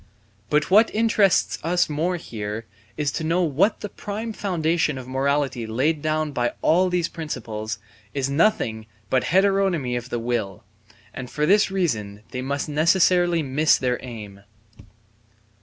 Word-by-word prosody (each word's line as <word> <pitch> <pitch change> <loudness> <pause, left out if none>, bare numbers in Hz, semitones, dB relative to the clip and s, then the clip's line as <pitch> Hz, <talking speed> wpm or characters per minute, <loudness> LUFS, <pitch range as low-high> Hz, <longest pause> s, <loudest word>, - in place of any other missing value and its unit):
But 150 +3 +1
what 215 +4 +6
interests 215 -4 +3
us 175 +2 +1
more 160 +4 -1
here 110 -7 -5 0.3
is 150 -2 0
to 160 - -4
know 170 +2 +1
that 190 +10 +2
the - - -3
prime 215 +3 -5
foundation 165 -7 0
of 130 -1 -8
morality 135 -2 0
laid 145 +8 0
down 155 0 0
by 120 -3 -1
all 180 +3 +4
these 175 -2 0
principles 110 -9 -5 0.3
is 135 -2 -1
nothing 140 - +1 0.2
but 130 -1 +2
heteronomy 190 -8 +2
of 120 0 -4
the 120 - -2
will, 115 -3 -3 0.5
and 125 -2 -7
for 150 - -1
this 200 +5 +4
reason 110 - -2
they 125 - -4
must 140 +2 -2
necessarily 170 +2 +3
miss 150 +3 +3
their 125 -1 -1
aim. 105 -5 -9
150 Hz, 145 wpm, -23 LUFS, 125-175 Hz, 0.5 s, what